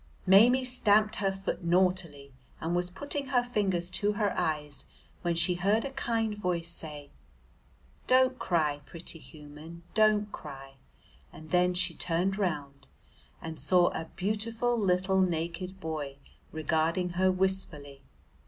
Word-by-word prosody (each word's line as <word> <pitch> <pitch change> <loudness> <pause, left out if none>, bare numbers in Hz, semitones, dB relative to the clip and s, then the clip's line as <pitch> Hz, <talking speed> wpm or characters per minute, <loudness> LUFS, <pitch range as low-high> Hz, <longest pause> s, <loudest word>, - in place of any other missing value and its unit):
Maimie 235 +7 +6
stamped 215 -4 +3
her 195 -1 +1
foot 195 -1 -4
naughtily, 170 -6 0 0.3
and 170 +2 -2
was 175 0 0
putting 285 +8 -3
her 250 -2 +2
fingers 190 -7 -1
to 205 +3 +1
her 205 -1 0
eyes, 150 -2 -2 0.3
when 170 -1 0
she 170 +2 +2
heard 200 +6 +1
a 275 - -4
kind 230 -5 -1
voice 175 -4 -2
say, 150 -4 -6 1.0
"Don't 255 0 +4
cry, 150 -5 0
pretty 170 -1 -5
human, 155 +2 -12
don't 210 -1 +3
cry," 135 -2 -10 0.5
and 155 0 -13
then 180 0 +3
she 180 -1 +2
turned 180 +5 0
round 145 -7 -3 0.6
and 160 -1 -6
saw 180 -1 +4
a 160 - -5
beautiful 225 +5 -1
little 190 -2 +2
naked 175 +2 -2
boy 150 -5 -5 0.3
regarding 160 +3 0
her 185 +2 +2
wistfully. 180 -7 0
180 Hz, 135 wpm, -29 LUFS, 160-205 Hz, 1.0 s, Maimie